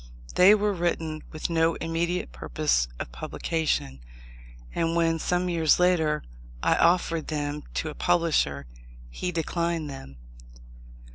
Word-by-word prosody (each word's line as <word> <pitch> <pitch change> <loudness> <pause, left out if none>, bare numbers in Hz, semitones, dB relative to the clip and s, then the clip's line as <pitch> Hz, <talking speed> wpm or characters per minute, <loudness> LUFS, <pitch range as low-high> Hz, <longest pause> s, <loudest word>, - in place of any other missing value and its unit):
They 190 +4 +7
were 210 0 +1
written 165 -3 -2
with 155 +2 -4
no 165 0 +2
immediate 165 - -2
purpose - - 0
of - - -5
publication; 70 - -2 0.7
and 165 0 0
when, 165 -1 +2
some 180 +2 0
years 165 -3 +3
later, 160 -4 +2 0.4
I - - +4
offered 170 -2 +2
them 150 -1 -3
to 160 - -1
a - - -6
publisher, 160 - +1 0.5
he 180 - -3
declined 170 -2 -2
them. 135 - -10
165 Hz, 125 wpm, -26 LUFS, 150-170 Hz, 0.7 s, They